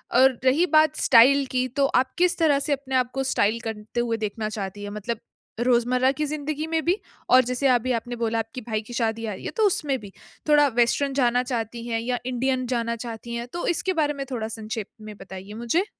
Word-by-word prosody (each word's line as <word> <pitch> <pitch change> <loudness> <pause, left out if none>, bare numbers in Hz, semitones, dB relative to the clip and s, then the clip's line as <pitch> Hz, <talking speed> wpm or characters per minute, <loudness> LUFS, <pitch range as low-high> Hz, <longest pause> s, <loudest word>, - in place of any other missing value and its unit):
और 260 -2 +5
रही 280 +7 +4
बात 310 -1 +5
स्टाइल 270 +4 +6
की 255 0 +1
तो 275 +2 +1
आप 260 0 -1
किस 355 0 +3
तरह 305 -4 +3
से 285 +1 +1
अपने 270 -1 -4
आपको 255 +1 0
स्टाइल 215 +3 +2
करते 220 +1 -5
हुए 230 -1 0
देखना 215 0 -3
चाहती 205 -1 -5
हैं? 205 - -5
मतलब 210 +2 -4 0.4
रोज़मर्रा 250 +2 +3
की 300 +2 -2
जिंदगी 305 +1 -3
में 325 0 0
भी 360 +3 +2 0.3
और 255 0 +7
जैसे 250 +3 0
अभी 250 +1 +1
आपने 240 +1 -7
बोला 230 0 0
आपके 225 +3 -5
भाई 215 -1 -3
की 240 - -9
शादी 225 -1 -1
आ 215 - -3
रही 185 - -10
है - - -3
तो 440 - +3
उसमें 290 -7 0
भी। 200 -2 -11 0.4
थोड़ा 295 -1 +6
वेस्टर्न 245 +3 +1
जाना 245 0 +3
चाहती 235 -1 -4
हैं? 225 -1 -1
या 245 +1 -2
इंडियन 255 +1 -1
जाना 235 -1 -1
चाहती 235 0 -7
हैं? 235 +1 -4
तो 345 - -3
इसके 370 +2 0
बारे 295 -1 +1
में 275 -1 -5
थोड़ा 225 -3 -2
संक्षेप 220 -1 -5
में 215 0 -9
बताइए 195 +1 -9
मुझे। 335 - +1
245 Hz, 220 wpm, -24 LUFS, 225-275 Hz, 0.4 s, और